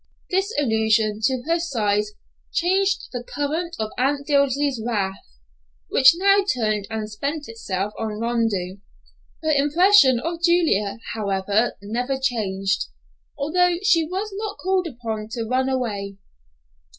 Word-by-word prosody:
This 385 +3 +1
allusion 220 -4 +2
to 255 -1 0
her 335 +2 +1
size 210 -9 0 0.4
changed 380 +4 +1
the 245 -1 -4
current 315 +6 -3
of 215 0 -3
Aunt 280 +2 +1
Dilsey's 280 -3 +1
wrath, 200 -5 -2 0.7
which 270 +5 +6
now 395 +2 +4
turned 215 - -1
and 220 -1 -3
spent 285 +8 -4
itself 205 -3 -4
on 215 -1 -3
Rondeau. 225 -6 -1 0.7
Her 315 - +1
impression 295 -1 +5
of 335 +5 -4
Julia, 330 - +2 0.2
however, 205 +1 0
never 245 +6 -2
changed, 205 -7 -1 0.5
although 345 +5 +2
she 350 -5 +4
was 380 +6 -4
not 420 -1 -4
called 375 -1 0
upon 225 -6 -5
to 230 - -2
run 260 +3 0
away. 205 -7 -3
255 Hz, 125 wpm, -23 LUFS, 215-330 Hz, 0.7 s, which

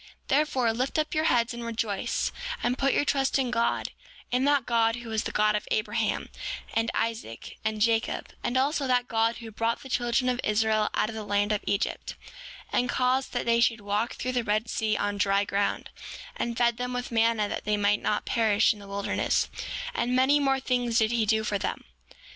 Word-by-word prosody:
7:19 - - -20 0.2
Therefore, 265 -5 +2
lift 255 +6 -1
up 310 0 0
your 310 0 +1
heads, 240 -4 +2
and 235 0 -6
rejoice, 225 -4 -1 0.3
and 245 +1 +1
put 275 +1 +1
your - - +2
trust 270 -1 +1
in 260 -3 0
God, 235 -1 0 0.4
in 255 +2 +2
that 285 -3 +3
God 230 -1 +2
who 240 -1 -8
was 220 -1 -1
the - - -2
God 210 0 +2
of 210 - -3
Abraham, 215 - -1 0.4
and 225 0 +1
Isaac, 225 - -3
and 220 -1 -1
Jacob; 225 +1 0
and 245 - 0
also, 275 +1 +1
that 250 -1 +2
God 225 0 +1
who 230 -2 -9
brought 230 +2 -1
the 265 - -10
children 245 0 +1
of 250 0 0
Israel 215 0 +2
out 215 - +1
of - - -6
the 220 -1 -5
land 205 0 +1
of 210 - 0
Egypt, 200 +1 -1 0.6
and 250 - +1
caused 255 +1 +1
that 245 - -1
they 235 0 +3
should 230 -2 +2
walk 205 +3 -1
through 255 - -3
the 245 -1 0
Red 215 +1 0
Sea 215 -1 0
on 205 0 -2
dry 200 0 +3
ground, 200 0 -1 0.4
and 235 -1 -3
fed 235 -1 +2
them 250 0 -3
with 245 0 -4
manna 225 -2 +2
that - - -5
they 210 0 +1
might 205 0 +2
not 210 - 0
perish 220 -2 +3
in 210 - -14
the 200 - -11
wilderness; 200 0 0 0.4
and 250 +1 0
many 265 +3 +4
more 270 -1 +2
things 245 -3 0
did 220 0 +3
he 230 -2 +1
do 220 +1 +2
for 205 -2 -1
them. - - -3
230 Hz, 210 wpm, -27 LUFS, 215-250 Hz, 0.6 s, many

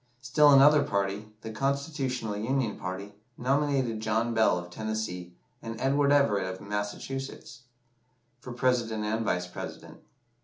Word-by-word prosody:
Still 145 +4 +5
another 145 +2 +7
party, 100 -2 -1
the 110 - -6
Constitutional 135 -3 -2
Union 115 +1 -1
party, 95 +2 -6 0.2
nominated 135 -3 +1
John 110 +2 0
Bell, 110 -5 +3
of 90 0 -7
Tennessee, 110 -4 -4 0.3
and 115 0 -6
Edward 140 +2 +2
Everett, 105 -10 +3
of 95 - -8
Massachusetts, 105 +5 -5 0.7
for 125 - -9
President 120 -3 0
and 110 +2 -1
Vice 90 -4 0
President. 90 - -9
115 Hz, 125 wpm, -28 LUFS, 105-135 Hz, 0.7 s, another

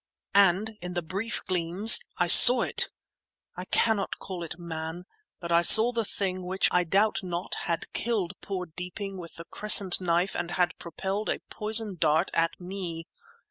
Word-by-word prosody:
And 200 +2 0
in 180 0 -9
the 175 - -4
brief 195 +8 -7
gleams 180 +4 +3 0.2
I 175 - -1
saw 240 +7 +9
it! - - 0 0.7
I - - -9
cannot 220 -3 -2
call 185 -2 -10
it 170 -1 -9
man, 165 0 -9 0.3
but 170 -1 -9
I 170 0 +2
saw 220 +7 +9
the 230 -1 -4
thing 185 -3 -5
which, 185 +2 -1
I 180 - 0
doubt 200 +5 -1
not, 180 -1 -7 0.2
had 165 -1 -6
killed 210 -6 -4
poor 185 -2 -7
Deeping 180 +3 -9
with 170 -2 -13
the 165 - -12
crescent 200 -3 +3
knife 175 +1 -3
and 170 - -6
had 175 -1 -4
propelled 190 +4 -7
a - - -3
poison 215 -2 -2
dart 155 +4 -1
at 165 0 -3
me. 175 -3 -9
180 Hz, 170 wpm, -24 LUFS, 170-200 Hz, 0.7 s, saw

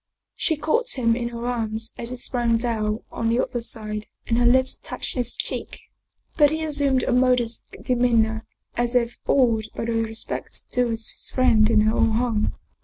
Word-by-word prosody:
She 320 - 0
caught 465 - +1
him 230 -2 +2
in 235 0 -2
her 235 0 -6
arms 225 -2 -1
as 235 - -6
he 250 - -4
sprang 240 -2 +1
down 220 -2 -1
on 230 - -1
the 235 +2 +2
other 240 - -1
side 215 -2 -4 0.2
and 230 0 +1
her 240 - +4
lips 260 +1 +3
touched - - -5
his 245 -2 0
cheek. - - -4 0.6
But 295 -2 +6
he 315 +1 -2
assumed 285 -4 +1
a - - 0
modest 250 -2 +2 0.2
demeanor, 230 -3 +2 0.3
as 240 +1 -1
if 240 -1 +1
awed 230 -5 +3
by - - -3
the 235 - -1
respect 225 0 -4
due 250 -1 +2
his 225 -1 -3
friend 225 -4 +4
in 215 - +4
her 215 +1 +2
own 220 - +3
home. 225 -2 0
235 Hz, 180 wpm, -23 LUFS, 225-250 Hz, 0.6 s, But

